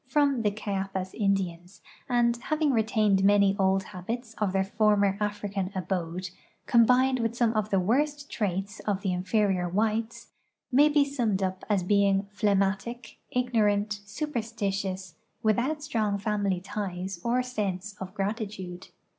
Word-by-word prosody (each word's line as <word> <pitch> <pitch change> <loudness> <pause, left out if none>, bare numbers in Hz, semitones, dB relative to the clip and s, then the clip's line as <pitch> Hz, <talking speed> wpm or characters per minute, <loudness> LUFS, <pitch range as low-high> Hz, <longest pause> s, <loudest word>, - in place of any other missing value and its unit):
from 280 -2 +2
the 210 - +2
Cayapas 195 -2 -3
Indians, 190 -2 -1 0.3
and, 240 -1 +3
having 305 +4 0
retained 215 -4 +2
many 200 0 +5
old 190 0 +3
habits 220 +6 -6
of 210 -3 +1
their 190 0 +2
former 205 -1 +2
African 205 -2 -2
abode, 180 -1 -3 0.3
combined 250 +2 +4
with 230 0 -1
some 235 -2 +2
of 215 -1 0
the 195 - +2
worst 285 +9 0
traits 200 -1 -2
of 200 -2 -2
the 190 -3 0
in 180 0 -2
ferior 190 -3 +1
whites, 220 +3 -1 0.4
may 285 +4 +6
be 290 -1 +4
summed 235 -9 0
up 185 0 -2
as 200 -3 +2
being 200 +1 +3
phlegmatic, 205 +4 -1
ignorant, 210 -4 +1
superstitious, 200 - -3 0.3
without 250 +8 +1
strong 215 -7 0
family 200 -3 0
ties 190 -2 -4
or 245 +2 +1
sense 205 -5 -3
of 190 0 -5
gratitude. 195 -3 -4
205 Hz, 140 wpm, -28 LUFS, 190-230 Hz, 0.4 s, may